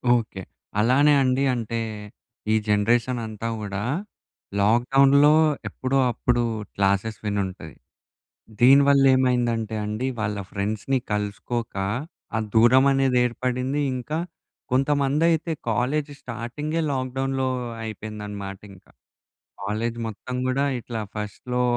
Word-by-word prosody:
Okay. 110 -5 -3 0.4
అలానే 135 +6 +5
అండి 130 +1 +2
అంటే 115 -1 -3 0.7
ఈ - - +4
జనరేషన్ 115 +4 +2
అంతా 110 +1 -5
కూడా 100 -1 -4 0.8
లాక్ 115 +4 +3
డౌన్‌లో 140 +2 +6 0.4
ఎప్పుడో 130 +1 -1
అప్పుడు 120 +1 0 0.3
క్లాసెస్ 100 +2 +1
విని 105 -1 0
ఉంటుంది. 85 -6 -9 0.9
దీనివల్లేమైందంటే 130 -4 +4
అండి 110 +5 -2
వాళ్ళ 105 -1 -1
ఫ్రెండ్స్‌ని 110 +6 -1
కలుసుకోక 105 +3 -3 0.6
ఆ - - +1 0.2
దూరం 125 +4 +6
అనేది 135 -2 +2
ఏర్పడింది, 125 +3 -1
ఇంకా 140 +5 -3 0.5
కొంతమంది 140 +3 +2
అయితే 165 +1 0 0.2
కాలేజ్ 140 +6 0
స్టార్టింగే 125 +7 -4
లాక్ 130 -2 -2
డౌన్‌లో 135 -1 0 0.3
అయిపోయిందనమాట. 105 -2 -6
ఇంకా 95 - -19 0.7
కాలేజ్ 110 +4 -2
మొత్తం 125 +4 -6
గూడా 130 +2 +1 0.2
ఇట్లా 115 -1 -5 0.2
ఫస్ట్‌లో 115 +4 -3
120 Hz, 105 wpm, -24 LUFS, 105-135 Hz, 0.9 s, డౌన్‌లో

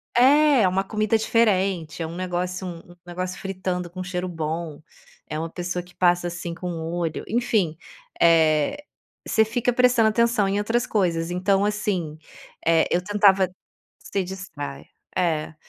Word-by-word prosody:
É! 280 +5 +6
É 190 - +4
uma 190 +1 +1
comida 215 +2 0
diferente, 190 -8 +1
é 165 - -2
um 165 - -8
negócio 180 +1 -3
um 175 - -6
um - - -16
negócio 180 +1 -5
fritando 185 -2 -3
com 185 - -9
um - - -2
cheiro 180 0 -3
bom, 160 -2 -4 0.5
é 155 - -3
uma 165 +1 -3
pessoa 180 0 -4
que 180 0 -19
passa, 175 -1 +2
assim, 170 0 -5
com 180 +1 -5
o 165 -1 -4
olho, 165 -2 -2
enfim, 215 -8 0 0.4
eh, 160 - +3 0.4
você 220 - +3
fica 240 +2 0
prestando 245 -2 +4
atenção 235 -2 +2
em 195 +1 0
outras 225 +4 0
coisas. 170 -5 0
Então, 195 +2 +2
assim, 195 -7 -2 0.5
eh, 165 0 +4
eu 175 - +1
tentava 195 -1 +4 0.5
se 195 - -3
distrai. 170 -7 -7 0.3
É. 160 -4 0
180 Hz, 160 wpm, -24 LUFS, 170-210 Hz, 0.5 s, É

